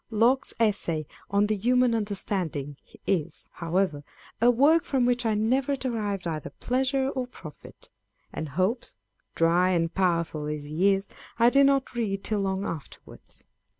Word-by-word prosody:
Locke's 235 +5 +2
Essay 195 -8 0 0.2
on 200 +1 +3
the 215 +1 0
Human 245 +3 +2
Understanding 190 -9 -2 0.3
is, 175 -6 -1
however, 170 -3 -1 0.4
a 240 - +6
work 290 +7 +4
from 260 -3 +1
which 245 -1 +1
I 220 - +1
never 260 +6 +1
derived 215 -8 -3
either 155 -3 -3
pleasure 265 +2 0
or 260 -2 -3
profit; 155 -11 -13 0.4
and 155 - -4
Hobbes, 190 - -1 0.4
dry 170 +2 +3
and 165 -2 0
powerful 170 -5 0
as 150 -1 -5
he 190 +5 +3
is, 195 +1 -6 0.3
I 235 +1 +5
did 275 +1 +6
not 275 -1 +1
read 205 -5 -2
till 215 -1 -1
long 195 0 -1
afterwards. 160 -4 -9
205 Hz, 150 wpm, -27 LUFS, 170-245 Hz, 0.4 s, a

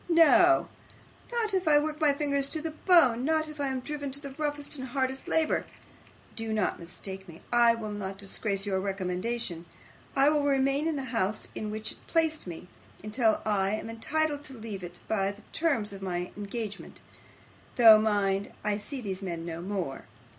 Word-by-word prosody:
No, 335 +1 +6 0.6
not 455 -3 0
if 375 -3 0
I 295 -1 +6
work 305 +1 -1
my 300 -2 +5
fingers 280 -1 0
to 315 - -2
the 320 +1 -4
bone, 310 -8 +4
not 315 +2 +1
if 305 -1 -7
I 280 - +1
am 260 -1 -2
driven 285 +1 -4
to 280 - -4
the 280 -1 -8
roughest 290 +1 -3
and 260 - -5
hardest 265 +1 -2
labour. 320 -1 +1 0.7
Do 225 -1 -3
not 215 -2 0
mistake 190 +3 -8
me. 165 - -12
I 235 -1 +6
will 220 -2 -5
not 195 -2 -5
disgrace 195 0 -2
your 195 -2 0
recommendation. 190 -1 -3 0.5
I 275 +1 +5
will 300 -1 +2
remain 275 +2 +2
in 325 - 0
the 275 - -3
house 215 -1 0
in 215 - -4
which 215 +1 -4
it - - -17
placed 320 - +1
me, 175 +1 -7 0.4
until 220 +1 +1
I 200 -1 +1
am 225 +1 -5
entitled 295 +5 -1
to 270 -4 -8
leave 215 -4 -6
it 175 0 -9
by 195 -2 +1
the 205 +1 -14
terms 270 -12 +1
of 195 - -9
my 180 -2 -3
engagement; 205 0 -6 0.7
though, 225 -3 +9
mind, 205 -2 +1
I 210 0 0
see 260 +5 -6
these 195 -3 -4
men 170 -3 -4
no 170 0 -5
more. 180 -7 -4
230 Hz, 185 wpm, -29 LUFS, 195-290 Hz, 0.7 s, though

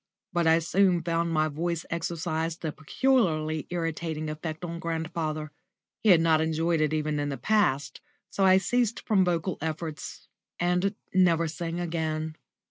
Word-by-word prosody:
But 170 -2 +2
I 160 0 +6
soon 175 +1 +2
found 170 0 0
my 155 -1 +2
voice 165 +2 -2
exercised 165 -1 -2
a 155 - -1
peculiarly 160 - +1
irritating 165 -2 -3
effect 155 +2 -5
on 170 0 -5
grandfather. 160 -2 -3 0.5
He 220 - +3
had 175 -4 +7
not 160 -1 +4
enjoyed 160 +1 +1
it 155 -1 +2
even 155 -1 -1
in 145 0 -1
the 140 - -3
past, 145 - +1 0.3
so 195 - 0
I 190 0 +7
ceased 235 +3 +1
from 200 -4 +4
vocal 175 0 -1
efforts 160 0 -5 0.3
and 180 +3 +1 0.2
never 170 -3 +4
sang 170 +1 -4
again. 160 -2 -2
165 Hz, 150 wpm, -27 LUFS, 155-175 Hz, 0.5 s, had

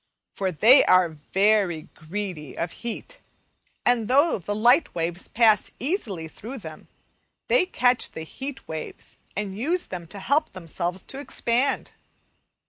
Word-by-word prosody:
For 190 -1 -1
they 225 - +7
are 185 -2 +5
very 185 +2 +1
greedy 165 -3 -6
of 170 0 -2
heat, 370 - -7 0.7
and 240 -3 +3
though 280 +2 +4
the 205 +4 -3
light 245 +8 +4
waves 170 +2 -2
pass 220 -3 +4
easily 230 - -2
through 230 +11 -8
them, 160 -8 -10 0.6
they 435 -8 +4
catch 250 -7 +2
the 160 - -6
heat 270 - -7
waves 160 -1 -7 0.2
and 200 -2 -3
use 330 - 0
them 175 -2 -7
to 200 - -9
help 285 +10 +1
themselves 180 +1 -4
to 270 - -7
expand. 265 -1 0
210 Hz, 135 wpm, -25 LUFS, 175-255 Hz, 0.7 s, they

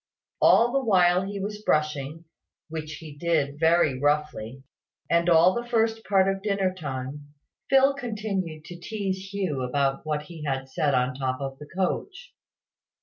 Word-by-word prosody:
All 235 +1 +6
the 275 +1 +1
while 180 -5 +4
he 200 +1 -5
was 210 +2 -5
brushing 150 -2 -1 0.4
(which, 155 -1 -5
he 150 -1 -10
did 145 -3 0
very 160 -5 +3
roughly), 145 -4 -1 0.5
and 170 +1 +3
all 170 +2 +6
the 240 0 -4
first 225 -1 +1
part 195 -2 +3
of 195 0 -1
dinner 195 -2 0
time, 145 -2 -6 0.3
Phil 270 +1 +5
continued 205 - -4
to 175 -1 -9
tease 195 -1 -4
Hugh 185 -9 -2
about 135 +2 0
what 150 -1 -2
he 160 0 -10
had 135 -2 -2
said 140 +1 +1
on 125 0 +1
the 130 - -12
top 130 -1 -1
of 135 -1 -5
the 150 - -10
coach. 375 - -3
165 Hz, 160 wpm, -26 LUFS, 145-195 Hz, 0.5 s, All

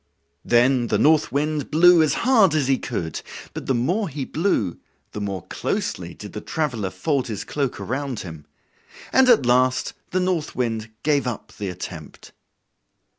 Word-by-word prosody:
Then 120 0 +3
the 105 - +1
North 150 +6 +3
Wind 150 +1 -1
blew 170 +2 +6
as 155 - +2
hard 220 - +5
as 145 -4 +1
he 135 -1 +2
could, 85 - -4 0.3
but - - -7
the 135 - +2
more 175 - 0
he 140 -2 -4
blew 150 - 0 0.3
the 105 - -6
more 100 -3 -4
closely - - -3
did - - -10
the - - -5
traveler 125 -11 -2
fold 140 - -1
his 110 -4 -4
cloak 140 -4 -2
around 135 -2 -3
him; 80 -4 -9 0.7
and 265 -1 +5
at 230 - +5
last 125 +1 +2 0.2
the 185 - 0
North 180 -4 -1
Wind 115 -3 -2
gave 145 -4 +2
up 120 -4 -5
the 100 -2 -4
attempt. 90 -4 -9
135 Hz, 165 wpm, -23 LUFS, 110-155 Hz, 0.7 s, blew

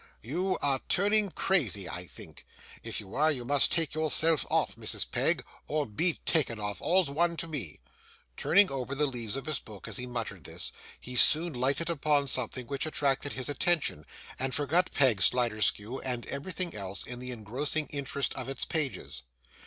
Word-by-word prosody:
You 180 - -1
are 140 -2 +2
turning 205 +2 +3
crazy, 130 - 0
I 90 0 -6
think. - - -12 0.3
If - - -3
you 95 - -10
are, 155 +2 +3
you 125 -5 -4
must 145 +2 +3
take 165 -2 +1
yourself 155 0 +3
off, - - +1
Mrs. - - -2
Peg - - +2 0.2
or 150 -1 0
be 160 - 0
taken 130 -9 +2
off. 105 -1 -4
All's 180 -4 +2
one 170 +3 +1
to 165 - -3
me.' 120 - -5 0.6
Turning 200 - +5
over 135 0 -3
the 150 +2 +2
leaves 120 -5 -3
of 135 - -5
his 155 -3 -1
book 105 -3 -11
as - - -1
he 125 - -3
muttered 115 -8 -5
this, - - -3 0.3
he 125 - -8
soon 160 +6 +6
lighted 135 +7 0
upon 145 -2 +2
something 130 -1 -1
which 140 +4 -3
attracted 140 -2 0
his 130 - -2
attention, 145 - 0 0.3
and 130 0 -1
forgot 155 +6 +1
Peg 125 -8 +3
Sliderskew 115 +1 +3
and 125 -3 -2
everything 175 +5 -3
else 100 -1 -4
in 125 0 -7
the 125 0 -6
engrossing 125 +7 -1
interest 140 -1 -2
of 130 0 -6
its 135 - -2
pages. 145 - -1
135 Hz, 175 wpm, -29 LUFS, 120-155 Hz, 0.6 s, soon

